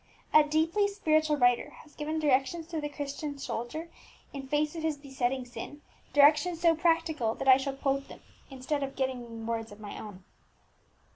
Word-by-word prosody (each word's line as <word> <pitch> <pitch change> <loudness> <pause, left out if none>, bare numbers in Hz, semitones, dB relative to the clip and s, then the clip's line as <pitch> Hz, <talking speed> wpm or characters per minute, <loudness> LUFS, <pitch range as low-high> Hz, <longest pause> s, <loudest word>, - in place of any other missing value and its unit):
A 305 - +8
deeply 320 +7 +2
spiritual 310 -7 +1
writer 245 -2 +3
has 295 - -20
given 305 +1 -3
directions 295 +2 +1
to 320 -3 -3
the 295 - -3
Christian 285 0 -5
soldier 270 +5 -5 0.5
in 275 -1 -6
face 300 +3 0
of 325 - -4
his 315 -2 -1
besetting 265 -2 -2
sin, 290 +4 -9 0.3
directions 300 +4 +5
so 335 -1 +4
practical 320 -8 +1
that 270 - -5
I 260 -1 +9
shall 270 0 -3
quote 275 0 -1
them - - -12 0.3
instead 270 +2 -3
of 275 -1 -4
giving 240 -4 -3
words 225 -1 -3
of 205 - -12
my 210 -1 -8
own. 200 -3 -10
285 Hz, 170 wpm, -29 LUFS, 260-310 Hz, 0.5 s, I